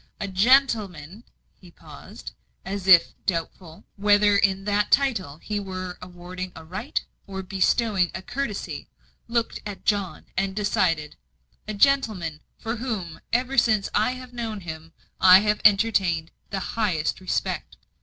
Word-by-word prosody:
"A 200 - -3
gentleman," 205 - +2 0.3
he - - -17
paused, - - -12 0.3
as 195 -1 -4
if 175 -3 +7
doubtful 165 -1 -4
whether 205 0 +4
in 195 -1 +2
that 205 0 +1
title 220 - +1
he 205 +5 -4
were 185 -2 -6
awarding 180 +1 -7
a 160 - -11
right 190 - -3 0.3
or 190 -1 -5
bestowing 195 0 +1
a 185 - -6
courtesy, 240 -2 -4 0.4
looked 235 0 -1
at 205 -2 -8
John, 200 -3 -1
and 195 0 -1
decided 165 -7 0 0.5
"a 215 - -4
gentleman 205 - +1 0.2
for 225 +2 -4
whom, 215 -9 -5
ever 250 +3 +2
since 220 -4 +2
I 215 +4 +2
have 255 -1 -10
known 225 -4 -4
him, 160 -1 -8 0.3
I 185 +1 +8
have 210 0 0
entertained 195 -6 +3 0.2
the 195 - -3
highest 185 -9 0
respect." 185 - -3
195 Hz, 135 wpm, -24 LUFS, 180-220 Hz, 0.5 s, I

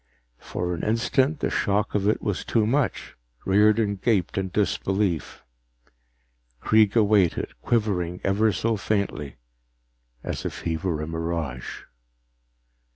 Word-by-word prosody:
For 90 0 -3
an 85 - -4
instant, 130 +7 +1
the - - 0
shock 100 +1 0
of 100 -1 +1
it 110 - +1
was 105 -4 -2
too 110 -2 +1
much; 125 0 -1 0.3
Riordan 105 +1 +3
gaped 95 -3 0
in 95 -1 -1
disbelief. 95 -2 -1 1.2
Kreega 110 - +4
waited, 100 -5 +2
quivering 90 -6 0
ever 105 +3 +2
so 110 +4 0
faintly 100 -9 -2 0.9
as - - -4
if - - -5
he 80 -1 -1
were 80 -3 -2
a - - -5
mirage. 80 -6 -4
100 Hz, 120 wpm, -25 LUFS, 90-110 Hz, 1.2 s, Kreega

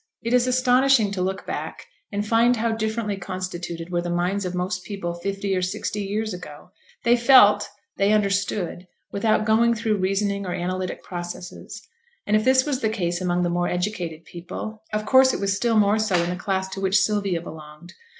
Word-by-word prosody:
It 230 +1 -1
is 250 0 +4
astonishing 255 -3 +3
to 195 -2 -3
look 190 +1 -2
back - - -5 0.3
and 205 0 -2
find 235 +2 +4
how 230 0 0
differently 220 -2 -2
constituted 175 -2 -5
were 175 -1 0
the 175 - -4
minds 180 +3 -1
of 180 0 -3
most 180 0 -2
people 195 -5 -4
fifty 195 +3 -3
or 185 - 0
sixty 185 +3 -3
years 210 +2 -2
ago; 175 -1 -10 0.3
they 235 0 +5
felt, 220 -5 +6 0.3
they 200 +1 +3
understood, 195 -3 0 0.2
without 215 +1 +1
going 230 +2 +3
through 225 -2 0
reasoning 200 +1 0
or 180 -2 -3
analytic 185 +1 -3
processes, 175 0 -7 0.4
and 210 - +2
if 215 - +3
this 260 +1 +4
was 280 -3 -2
the 220 - +1
case 175 -5 -2
among 180 -1 0
the 175 - +1
more 175 0 0
educated 180 -3 -3
people, 185 +5 -7
of 215 0 -2
course 260 -1 +5
it - - -4
was 200 0 0
still 230 +2 +1
more 210 +1 +3
so 215 -4 +1
in 175 - -2
the - - -2
class 190 0 -2
to 195 0 -6
which 195 +1 +3
Sylvia 200 -2 0
belonged. 160 +1 -11
200 Hz, 190 wpm, -23 LUFS, 180-220 Hz, 0.4 s, felt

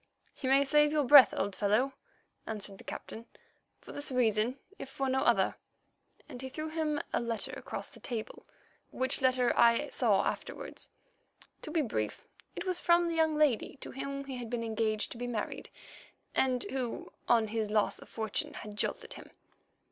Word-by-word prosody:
"You 260 - -2
may 275 +1 +5
save 295 +1 +4
your 300 -1 +2
breath, 265 -2 +9
old 200 0 -1
fellow," 220 +7 +2 0.5
answered 205 -3 -4
the - - -12
Captain, 230 +1 -8 0.5
"for - - -11
this 285 -1 -4
reason 235 0 +2 0.2
if 270 - -6
for 270 0 -2
no 265 0 +1
other," - - +3 0.7
and 245 - -9
he 265 - -5
threw 310 +4 -5
him 310 -2 -1
a - - +2
letter 235 -2 -2
across - - -5
the - - -13
table, 230 -4 -6 0.5
which 260 +1 0
letter 255 -2 +3
I 235 -1 +4
saw - - +2
afterwards. - - -5 0.7
To - - -7
be 325 -3 +1
brief, 110 - -3 0.3
it - - -5
was 365 -1 0
from 345 0 +4
the 335 - -2
young 320 -1 +3
lady 290 -3 +2
to - - -7
whom 275 +1 -5
he 265 -2 -5
had 240 -2 -6
been 240 -1 -2
engaged 220 -1 -1
to 235 - -7
be 245 - -3
married, 225 -4 -4 0.6
and 255 -2 +2
who 255 -3 -4 0.2
on 225 -3 +4
his 220 -1 -1
loss 210 0 +1
of - - -14
fortune 220 -3 -3
had 210 -1 -8
jilted - - -2
him. - - -11
250 Hz, 180 wpm, -31 LUFS, 220-280 Hz, 0.7 s, breath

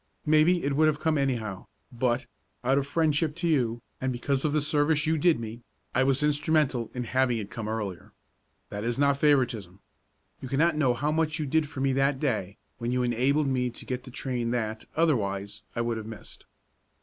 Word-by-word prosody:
Maybe 155 +3 +4
it 140 0 0
would 155 +2 +4
have 150 -1 +1
come 160 0 +1
anyhow, 120 -9 -2 0.2
but, 120 +1 0 0.4
out 135 +3 +3
of 140 - -3
friendship 155 0 +1
to 170 0 -2
you, 120 -7 +1 0.2
and 130 0 0
because 130 +2 -1
of 155 - +1
the 150 - +2
service 150 0 +2
you 160 +1 +2
did 160 -2 +3
me, 115 +1 -7 0.3
I 130 - +3
was 135 +2 +2
instrumental 150 -5 +1
in 125 - -2
having 125 0 +1
it 105 -2 -5
come 115 -3 -5
earlier. 105 -6 -4 0.6
That 105 0 -5
is 120 0 -1
not 140 0 +3
favoritism. 120 - +1 0.6
You 130 - -6
can't 155 +5 +2
know 130 -5 +3
how 145 +5 0
much 160 0 0
you 155 - -2
did 150 +1 +1
for 145 -3 -6
me 135 -1 +2
that 135 0 +2
day 110 -9 -1 0.2
when 120 0 -2
you 125 0 +1
enabled 130 +5 +2
me 125 -1 +1
to 120 - -10
get 125 -1 -4
the 130 - -11
train 125 -2 -2
that, 110 -2 -2
otherwise, 105 -10 0
I 120 - 0
would 115 -1 -1
have 110 -1 -6
missed. 110 -1 -11
130 Hz, 200 wpm, -27 LUFS, 115-150 Hz, 0.6 s, Maybe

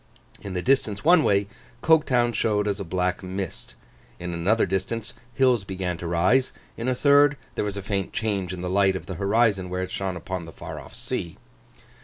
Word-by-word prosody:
In 100 -2 -6
the 90 - -2
distance 120 -6 +1
one 170 -1 +6
way, 100 0 +3 0.4
Coketown 130 -7 +3
showed 105 -3 +1
as 100 -1 -1
a - - -3
black 90 0 -1
mist; 95 -1 -5 0.4
in 90 0 -4
another 95 +7 +2
distance 100 +4 -3 0.2
hills 125 -5 +3
began 95 -2 -3
to 85 - -5
rise; 90 +11 +2 0.2
in 115 - -4
a 130 - +1
third, 145 +1 +5 0.2
there - - -1
was 100 -1 -3
a 100 - -5
faint 100 -2 -2
change 100 -5 -2
in 90 -1 -6
the 90 - -3
light 95 +1 +3
of 95 - -5
the 95 - -5
horizon 100 -2 +2
where 90 +1 -2
it 95 - -6
shone 95 -2 -3
upon 90 +1 -5
the 80 - -10
far - - -7
off - - -12
sea. 85 -1 -3
100 Hz, 200 wpm, -25 LUFS, 90-115 Hz, 0.4 s, one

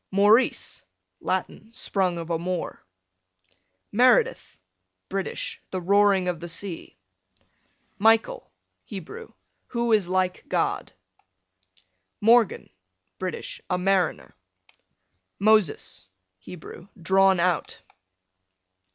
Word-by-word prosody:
Maurice, 205 - +3 0.4
Latin, 190 +4 -3
sprung 190 -6 0
of 165 0 -5
a 165 - 0
Moor. 180 0 -4 1.1
Meredith, 445 - +3 0.5
British, - - -4
the 185 - -3
roaring 195 0 +3
of 175 -3 -1
the 175 +1 -7
sea. 170 - -6 1.0
Michael, 225 - +2 0.3
Hebrew, 205 - -9 0.4
who 235 -1 -1
is 205 -5 +3
like 185 0 0
God. - - -1 1.3
Morgan, 230 0 +3 0.5
British, 185 -1 -5
a 180 - +1
mariner. 190 0 0 1.0
Moses, 200 - +2 0.3
Hebrew, 175 - -11
drawn 190 +2 +4
out. 175 -2 -1
190 Hz, 85 wpm, -25 LUFS, 180-220 Hz, 1.3 s, drawn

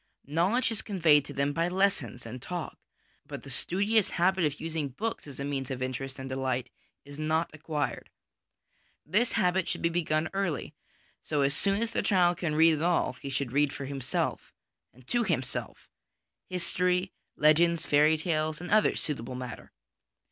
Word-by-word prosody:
Knowledge 180 - +1
is 225 - -1
conveyed 160 -8 +3
to 145 - -7
them 140 +1 0
by 165 +3 +1
lessons 185 -9 0
and 120 +2 -7
talk, 175 -1 -5 0.5
but - - -7
the - - -9
studious 205 +3 +1
habit 180 0 +2
of 150 -1 -2
using 160 -3 -3
books 215 - -4
as 140 -2 -9
a - - -2
means 135 -2 -3
of 130 -2 -3
interest 130 +1 -4
and 130 0 -6
delight 130 -1 -2 0.3
is 145 +1 -10
not 160 +2 0
acquired. 155 -2 -3 1.0
This 210 +10 +2
habit 185 -3 +2
should - - -3
be 170 - +3
begun 160 -2 0
early; 195 -9 -2 0.5
so 145 -3 +1
soon 200 +8 +1
as 230 - -3
the - - 0
child 175 -3 +3
can 155 -4 -1
read 160 +1 +6
at - - -4
all, 175 -5 +2
he 135 +2 -8
should 135 -2 -2
read 145 +1 +2
for 140 - -6
himself, 135 -2 -2 0.4
and 130 0 -20
to 240 - +1
himself, 150 - -3 0.6
history, 180 +1 0 0.2
legends, 165 +2 +4
fairy 150 +2 +4
tales, 155 -1 -1
and 180 - -7
other 215 0 +4
suitable 130 -4 -3
matter. 125 -2 -7
155 Hz, 170 wpm, -29 LUFS, 140-180 Hz, 1.0 s, read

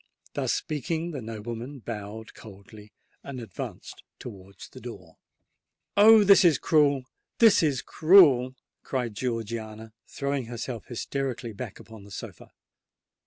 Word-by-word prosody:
Thus - - -1
speaking, 160 +3 -3
the 140 -5 -6
nobleman 115 +4 -7
bowed 110 -2 -8
coldly, 105 0 -14 0.3
and 135 -2 -7
advanced 110 -7 -8 0.2
towards 100 -4 -11
the - - -14
door. - - -10 0.8
"Oh! 215 +1 +8
this 200 0 +7
is 165 -6 +5
cruel—this 150 - +2
is 145 -5 0
cruel!" 145 -8 +5 0.3
cried 125 -4 -3
Georgiana, 110 -2 -5
throwing 140 -2 -3
herself 120 0 -6
hysterically 125 -1 -4
back 105 0 -8
upon 110 -3 -13
the 100 - -14
sofa. 95 - -9
125 Hz, 120 wpm, -26 LUFS, 110-145 Hz, 0.8 s, Oh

